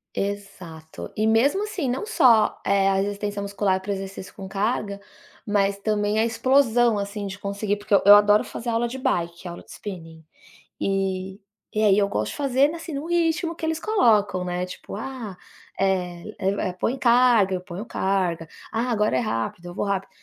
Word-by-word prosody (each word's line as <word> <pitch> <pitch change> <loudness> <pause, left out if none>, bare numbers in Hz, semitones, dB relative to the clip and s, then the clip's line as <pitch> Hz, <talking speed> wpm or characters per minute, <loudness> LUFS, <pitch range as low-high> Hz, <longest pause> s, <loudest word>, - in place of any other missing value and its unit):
Exato, 190 -6 -6
e 215 - +1
mesmo 255 - +3
assim, 380 -10 -3
não 260 +11 -2
só, 240 - +4
eh, 195 -1 +2
a 195 - +3
resistência 205 +1 -2
muscular 200 -1 0
para 195 - -10
o 200 - +1
exercício 195 0 -7
com 195 -2 -8
caga, 200 0 -2 0.4
mas 200 -1 +1
também 210 0 0
a 225 - +3
explosão, 240 -1 +3
assim, 200 +1 -4
de 195 0 -6
conseguir, 200 +1 -2
porque 205 0 +1
eu - - +4
eu 205 - +11
adoro 205 0 +5
fazer 240 - -6
aula 235 +1 +1
de 265 +3 -6
bike, 170 -5 -2
aula 175 0 -8
de - - -17
spinning, 165 -5 -9 0.6
eh, 190 -1 -2 0.4
e - - +3
aí 205 -1 +5
eu 200 - +3
gosto 105 - -2
de - - -7
fazer, 280 +1 +2
assim, 330 -1 -7
no 280 +2 -4
ritmo 335 0 0
que 320 - -4
eles 320 0 -1
colocam, 215 - +2
né, 180 0 -2
tipo: 185 +2 -8
"Ah, 225 -4 -6 0.4
eh 185 0 -1
eh, 195 -1 -1
põe 250 - 0
carga", 235 -6 +4
eu - - -5
ponho 180 +2 -7
carga, 185 -7 -1 0.2
"ah, 235 +3 -1
agora 215 -2 +1
é - - +2
rápido", 170 - -3
eu 175 - -8
vou - - -2
rápido, 195 -1 -2
205 Hz, 185 wpm, -24 LUFS, 190-235 Hz, 0.6 s, eu